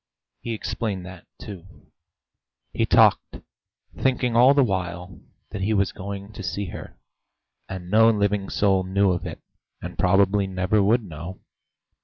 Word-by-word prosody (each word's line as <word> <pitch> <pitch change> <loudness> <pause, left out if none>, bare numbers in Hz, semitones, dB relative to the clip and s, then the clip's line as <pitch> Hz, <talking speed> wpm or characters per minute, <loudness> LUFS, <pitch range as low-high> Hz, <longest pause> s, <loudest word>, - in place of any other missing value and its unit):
He 115 - -4
explained 105 -4 -4
that, 90 -1 -12
too. 95 -3 -12 0.8
He - - 0
talked, - - +4 0.6
thinking 125 -2 0
all 125 +4 +6
the 140 - +5
while 90 - -4 0.3
that 100 - -5
he 110 +3 +1
was 100 -1 +1
going 100 +1 -7
to 105 - -8
see 95 +2 -4
her, - - -9 0.7
and 95 -2 -7
no 110 +1 +6
living 105 -2 0
soul 95 -2 +2
knew 95 +1 +2
of 90 - -3
it, - - -9 0.4
and 90 0 -8
probably 95 +2 +3
never 95 +3 +1
would 110 +4 +3
know. 85 +1 -9
100 Hz, 145 wpm, -24 LUFS, 90-105 Hz, 0.8 s, all